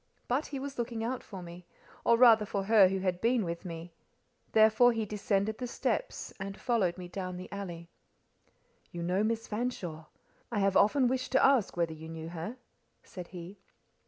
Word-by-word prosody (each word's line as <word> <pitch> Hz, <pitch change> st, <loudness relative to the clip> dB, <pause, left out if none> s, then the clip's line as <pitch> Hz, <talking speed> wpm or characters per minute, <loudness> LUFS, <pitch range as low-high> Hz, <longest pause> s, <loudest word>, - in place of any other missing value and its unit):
But 265 Hz, +5 st, 0 dB
he 280 Hz, -, -5 dB
was 275 Hz, -1 st, -6 dB
looking 230 Hz, -1 st, -2 dB
out 245 Hz, +3 st, -2 dB
for 190 Hz, -4 st, -9 dB
me, 175 Hz, +1 st, -11 dB, 0.4 s
or 235 Hz, -, +4 dB
rather 230 Hz, -3 st, +7 dB
for 200 Hz, -1 st, -2 dB
her 210 Hz, -1 st, +6 dB
who 190 Hz, +1 st, -1 dB
had 185 Hz, -1 st, -1 dB
been 235 Hz, -2 st, +2 dB
with 170 Hz, 0 st, -4 dB
me: 165 Hz, 0 st, -7 dB, 0.6 s
therefore 220 Hz, +3 st, +6 dB
he 225 Hz, -1 st, -1 dB
descended 210 Hz, +1 st, -1 dB
the 250 Hz, -, -3 dB
steps, -, -, -2 dB
and 195 Hz, 0 st, -5 dB
followed 200 Hz, -8 st, +1 dB
me 180 Hz, -1 st, -7 dB
down 185 Hz, 0 st, -5 dB
the 185 Hz, -, -7 dB
alley. 175 Hz, -4 st, -6 dB, 1.0 s
"You 170 Hz, -1 st, -5 dB
know 185 Hz, +4 st, +1 dB
Miss 225 Hz, +1 st, -1 dB
Fanshawe? 200 Hz, -9 st, -4 dB, 0.5 s
I 225 Hz, -, -2 dB
have 195 Hz, -1 st, +2 dB
often 255 Hz, +5 st, +4 dB
wished 255 Hz, +1 st, -1 dB
to 265 Hz, -, +5 dB
ask 265 Hz, -10 st, +3 dB
whether 170 Hz, -2 st, 0 dB
you 160 Hz, +1 st, -10 dB
knew 160 Hz, 0 st, -6 dB
her," 175 Hz, +9 st, -6 dB, 0.5 s
said 180 Hz, -2 st, -9 dB
he. 180 Hz, +2 st, -9 dB
200 Hz, 185 wpm, -31 LUFS, 175-230 Hz, 1.0 s, rather